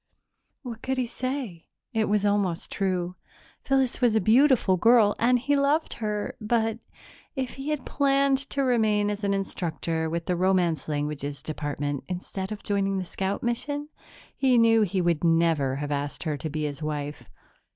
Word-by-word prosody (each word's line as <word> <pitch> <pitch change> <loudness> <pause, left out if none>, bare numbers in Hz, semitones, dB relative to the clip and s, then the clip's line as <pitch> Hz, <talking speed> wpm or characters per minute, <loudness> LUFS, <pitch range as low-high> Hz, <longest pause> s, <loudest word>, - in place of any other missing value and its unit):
What 235 -3 -7
could 265 0 -2
he 255 - +1
say? 245 - -5 0.3
It 220 -2 +1
was 210 0 +2
almost 200 -4 0
true. 185 -2 -1 0.5
Phyllis 265 -2 +1
was 240 -3 +3
a - - +5
beautiful 230 -1 +4
girl 220 +2 +5
and 250 +2 +4
he 285 +4 +1
loved 285 +3 +1
her, 210 -1 -2
but, 225 0 0 0.6
if 260 -3 -2
he 275 +2 -6
had 300 -3 -2
planned 275 -1 +2
to 275 - 0
remain 215 -5 +2
as 205 +1 -5
an 200 0 +1
instructor 165 -4 -2
with 170 +1 -3
the 180 - 0
Romance 180 -3 +1
Languages 145 -2 -3
Department 145 -2 -3
instead 190 +2 -5
of 210 - -6
joining 195 -1 0
the 185 - -3
scout 190 +3 -3
mission, 290 +5 -2 0.5
he 260 -2 +3
knew 225 -1 +5
he 195 -2 +1
would 170 -2 +1
never 165 -5 +2
have 145 +1 -4
asked 145 0 -3
her 155 -3 -1
to 150 +3 -5
be 155 +1 -3
his 145 0 -4
wife 150 -1 -4
200 Hz, 170 wpm, -26 LUFS, 165-240 Hz, 0.6 s, a